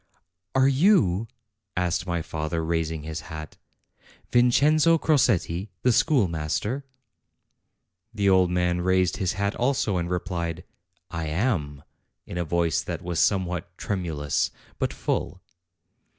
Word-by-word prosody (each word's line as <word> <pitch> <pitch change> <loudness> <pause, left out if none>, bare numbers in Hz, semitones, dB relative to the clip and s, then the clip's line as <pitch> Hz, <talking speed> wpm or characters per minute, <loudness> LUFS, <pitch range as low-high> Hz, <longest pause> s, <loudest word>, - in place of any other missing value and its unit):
"Are 130 0 +5
you," 130 - +3 0.5
asked 90 +1 0
my 85 -2 -1
father, 80 +1 -3
raising 80 -2 -1
his 80 0 -5
hat, 80 -1 -8 0.7
"Vin 120 0 +5
cenzo 155 +6 +4
Crosetti, 105 - +1
the 125 - +4
schoolmaster?" 110 - +1 1.3
The 100 -3 0
old 95 -2 +5
man 90 0 +1
raised 95 0 +2
his 95 -4 0
hat 100 +2 -1
also, 120 -6 +1
and 85 0 -2
replied: 90 -2 -3 0.5
"I 80 -1 -3
am," 75 - -1 0.4
in 90 - -5
a - - +1
voice 85 -2 +1
that - - -5
was 85 -2 -2
somewhat 90 -3 0
tremulous, 80 -7 -1 0.3
but - - 0
full. - - -2
90 Hz, 120 wpm, -25 LUFS, 85-110 Hz, 1.3 s, Are